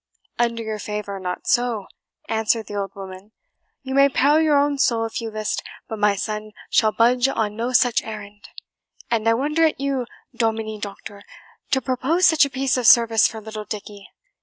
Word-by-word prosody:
"Under 235 -1 0
your 220 -1 -4
favour, 210 -1 -5
not 180 -1 -5
so," 240 -4 +1 0.4
answered 220 0 0
the - - -9
old 200 -1 -4
woman; 195 +2 -10 0.5
"you 265 0 -5
may 275 +1 +5
peril 290 +4 +3
your 305 -2 +3
own 285 0 +1
soul, 230 -4 +2
if 225 - -4
you 225 - -4
list, 215 0 -3 0.3
but 220 - -6
my 205 -1 +3
son 215 +1 -4 0.2
shall 220 -2 +4
budge 245 +3 +3
on 215 -5 -1
no 235 +3 -2
such 245 -1 +3
errand. 210 -1 -9 0.6
And 225 -1 0
I 230 - +4
wonder 300 +6 +1
at 315 -4 +2
you, 270 -3 -2 0.3
Dominie 220 -2 -1
Doctor, 200 0 -8 0.5
to 265 -2 +2
propose 275 +8 +1
such 315 -2 +5
a - - -4
piece 270 -1 0
of 245 -3 +1
service 230 -2 +6
for 225 - -7
little 215 0 -7
Dickie." 205 -1 -8
225 Hz, 185 wpm, -22 LUFS, 210-260 Hz, 0.6 s, service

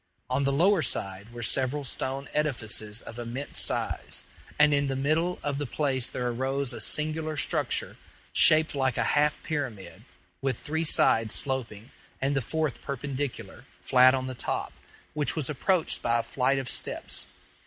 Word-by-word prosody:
On 135 +2 +1
the 140 - +2
lower 175 +6 +4
side 100 -5 -2
were 120 0 -6
several 135 +5 +1
stone 135 +1 -4
edifices 115 -7 -2
of 115 - -9
immense 120 +4 -3
size; - - -1 0.3
and 150 0 +5
in 140 0 +2
the 135 - -1
middle 155 +6 +1
of 145 -1 -2
the 145 - -2
place 130 -1 +1
there 125 - -3
arose 130 +2 0
a - - -6
singular 155 0 0
structure, - - 0 0.4
shaped 155 0 +5
like 130 -3 0
a - - +2
half 150 0 +3
pyramid, 135 - -4 0.4
with 135 -4 0
three 160 +2 -2
sides 115 -7 +3
sloping, 125 -5 -3 0.3
and 140 +1 0
the 135 - +2
fourth 155 +2 -2
perpendicular, 140 0 -5 0.2
flat 130 0 +6
on 130 -1 -2
the 130 - -4
top, - - -3 0.4
which 150 -3 0
was 150 -2 -1
approached 165 +4 +1
by 120 0 +2
a 115 - 0
flight 130 +3 +1
of 135 -1 -3
steps. - - -2
135 Hz, 165 wpm, -28 LUFS, 125-150 Hz, 0.4 s, flat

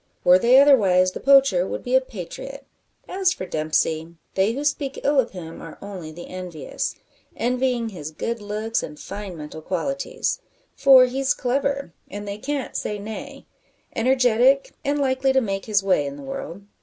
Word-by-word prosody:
Were 180 +1 +7
they 245 +6 +6
otherwise, 195 -10 +5
the - - -7
poacher 270 -10 +5
would - - -5
be 250 - -3
a 260 - +6
patriot. 260 +5 -8 0.4
As 375 0 +1
for 185 - -6
Dempsey, 160 0 -1 0.2
they 195 +4 +2
who 280 +4 -4
speak 280 -1 -1
ill 285 0 +3
of 245 - +2
him 165 -3 -9
are 165 - -10
only 185 -6 -8
the 175 +2 -10
envious 180 -4 -5 0.4
envying 250 -1 0
his 160 -7 -7
good 230 +8 -4
looks, 215 +2 -2
and 150 0 -8
fine 200 -1 -7
mental 155 +1 -8
qualities. 275 - -2 0.4
For 265 -2 +7
he's 265 +2 0
clever, 275 -3 -1 0.2
and 205 +1 -7
they 200 +1 -5
can't 285 +2 -3
say 210 - -2
nay 220 +7 -8 0.5
energetic, 255 +2 +3
and 285 +1 0
likely 265 -1 +1
to 265 - +5
make 195 -5 -3
his 205 -3 +2
way 185 -7 +2
in 140 - -6
the 140 - -10
world. 165 +7 -6
220 Hz, 170 wpm, -23 LUFS, 180-270 Hz, 0.5 s, Were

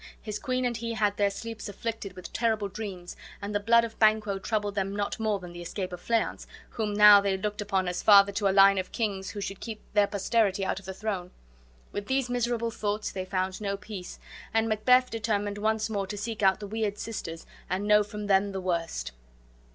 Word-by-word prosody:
His 210 -1 -5
queen 255 -2 -1
and 240 -1 0
he 230 0 -4
had 205 -1 +1
their 205 -1 +3
sleeps 225 +2 -7
afflicted 205 -1 -5
with 185 -1 -10
terrible 220 -3 +1
dreams, 195 -3 -7 0.2
and 200 +1 -5
the 205 - +1
blood 230 +3 +4
of 230 -1 -6
Banquo 215 -2 +3
troubled 205 0 -1
them 195 0 -2
not 205 +1 -2
more 215 -2 +1
than 180 -2 -10
the 175 - -8
escape 180 +1 -5
of 180 - -7
Fleance, 230 -1 -1 0.2
whom 210 -2 -2
now 210 -1 +9
they 195 -1 0
looked 210 +2 -3
upon 195 -3 0
as 180 0 -2
father 200 -1 +7
to 200 0 0
a - - +4
line 195 0 +6
of 185 - -5
kings 200 -4 -2
who 205 - -6
should 195 0 -5
keep 220 -2 -7
their 205 -1 +4
posterity 200 -1 +1
out 190 - -1
of 195 - -16
the 190 - -4
throne. 195 -4 -3 0.6
With 205 0 -5
these 265 -2 0
miserable 235 -1 0
thoughts 210 -1 -2
they 185 -1 -4
found 185 +1 -2
no 200 -1 -2
peace, 200 -3 -8 0.4
and 225 0 +3
Macbeth 250 +4 +3
determined 205 -2 -1
once 215 +1 +1
more 200 -3 -2
to 205 +1 -5
seek 220 +1 -4
out 190 -1 +4
the 210 - -6
weird 210 0 -2
sisters 165 -7 -6 0.2
and 190 +3 -1
know 210 0 +6
from 210 0 -7
them 200 0 +2
the 190 - -3
worst. 165 - -2
205 Hz, 215 wpm, -28 LUFS, 195-220 Hz, 0.6 s, now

